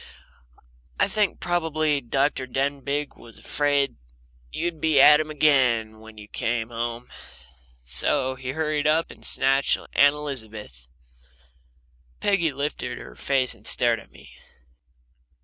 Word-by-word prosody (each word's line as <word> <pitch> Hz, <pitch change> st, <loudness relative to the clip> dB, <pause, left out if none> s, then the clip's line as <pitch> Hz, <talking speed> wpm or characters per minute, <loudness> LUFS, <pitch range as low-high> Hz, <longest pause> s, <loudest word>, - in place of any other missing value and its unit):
I -, -, +4 dB
think 210 Hz, -2 st, 0 dB
probably 155 Hz, -4 st, 0 dB
Dr. 135 Hz, +1 st, 0 dB
Denbigh 140 Hz, +2 st, -2 dB
was 115 Hz, -, -13 dB
afraid 145 Hz, -2 st, 0 dB, 0.5 s
you'd 165 Hz, -, -3 dB
be 155 Hz, -3 st, +3 dB
at 150 Hz, +2 st, +8 dB
him 155 Hz, 0 st, -2 dB
again 125 Hz, -8 st, +2 dB
when 110 Hz, 0 st, -14 dB
you 105 Hz, -1 st, -11 dB
came 115 Hz, +1 st, -2 dB
home, 120 Hz, +1 st, -4 dB, 0.8 s
so 70 Hz, -, 0 dB
he 130 Hz, 0 st, -6 dB
hurried 155 Hz, -1 st, -1 dB
up 160 Hz, +2 st, +2 dB
and -, -, -15 dB
snatched 135 Hz, +1 st, +2 dB
Aunt 145 Hz, +1 st, +3 dB
Elizabeth." 110 Hz, -, -7 dB, 1.3 s
Peggy 185 Hz, -6 st, +1 dB
lifted 135 Hz, -3 st, -4 dB
her -, -, -11 dB
face 135 Hz, -2 st, 0 dB
and 115 Hz, -1 st, -11 dB
stared 120 Hz, -2 st, +2 dB
at -, -, -16 dB
me. -, -, -17 dB
135 Hz, 125 wpm, -24 LUFS, 120-150 Hz, 1.3 s, at